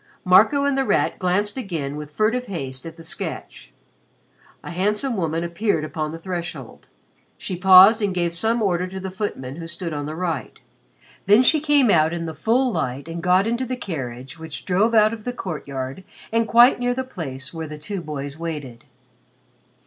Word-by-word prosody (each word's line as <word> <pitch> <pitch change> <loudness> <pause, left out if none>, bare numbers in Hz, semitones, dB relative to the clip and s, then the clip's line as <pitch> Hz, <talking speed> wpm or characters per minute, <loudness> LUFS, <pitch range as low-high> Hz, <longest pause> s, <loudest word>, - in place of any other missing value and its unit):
Marco 215 +10 +5
and 280 -1 +1
The 270 - +1
Rat - - 0
glanced 200 +5 0
again 160 - -4
with 150 -1 -7
furtive 230 +9 0
haste 135 -7 -5
at 165 0 -10
the 165 - -11
sketch. 60 - -7 0.9
A - - -7
handsome 210 +8 0
woman 165 -3 -1
appeared 170 0 -1
upon 155 0 -3
the 165 - -6
threshold. 175 0 -6 0.5
She 185 - -5
paused 190 +4 +7
and 205 -2 +1
gave 175 -2 -1
some 225 +6 +1
order 180 -2 0
to 190 +1 -7
the 190 0 -5
footman 155 -9 -5
who 165 -1 -7
stood 170 -1 -5
on 145 -1 -4
the 155 - -5
right. 165 -8 -3 0.7
Then 210 +5 +6
she 310 +5 +4
came 290 -6 +3
out 160 -1 +3
in 170 -1 -3
the 160 - -5
full 240 - +1
light 140 - -3
and 165 0 -5
got 185 +2 +3
into 235 +3 -1
the 255 0 -3
carriage 135 - -6
which 160 -2 -7
drove 205 +5 +2
out 215 0 +5
of 220 -2 -8
the 245 - -3
courtyard 140 - -5 0.3
and 230 0 +2
quite 240 +3 +6
near 245 0 0
the 260 - -2
place 145 - -7
where 160 -1 -5
the 150 0 -8
two 175 +6 -5
boys 145 -1 -6
waited. 150 -8 -6
180 Hz, 185 wpm, -22 LUFS, 155-215 Hz, 0.9 s, paused